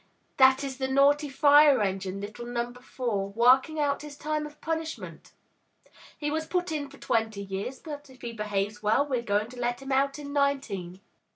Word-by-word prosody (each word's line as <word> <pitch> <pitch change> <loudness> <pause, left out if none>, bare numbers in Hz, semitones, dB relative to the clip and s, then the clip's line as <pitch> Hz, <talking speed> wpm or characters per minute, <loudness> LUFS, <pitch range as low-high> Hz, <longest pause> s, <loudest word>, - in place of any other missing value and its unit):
That 265 +1 +6
is 270 -2 -4
the 265 - 0
naughty 285 +2 +3
fire 285 0 +6
engine, 195 -1 -2
little 215 +4 -7
Number 240 +1 -4
Four, 225 -7 -3
working 255 +8 +4
out 285 -1 +1
his 295 -1 -9
time 305 0 -2
of 300 0 -16
punishment. 320 0 -5 0.9
He 295 -1 -2
was 315 +1 -2
put 360 -1 -1
in 290 -3 -3
for 280 - -15
twenty 220 -5 -1
years, 195 +7 -5
but 290 -3 -9
if 260 -1 -17
he 235 -1 -5
behaves 210 -1 -2
well, 220 +7 +3
we're 260 -4 -1
going 210 -1 0
to 250 - -10
let 240 0 -1
him 270 0 -7
out 275 +1 +2
in 285 -1 -7
nineteen!' 235 -11 -1
265 Hz, 185 wpm, -28 LUFS, 220-290 Hz, 0.9 s, That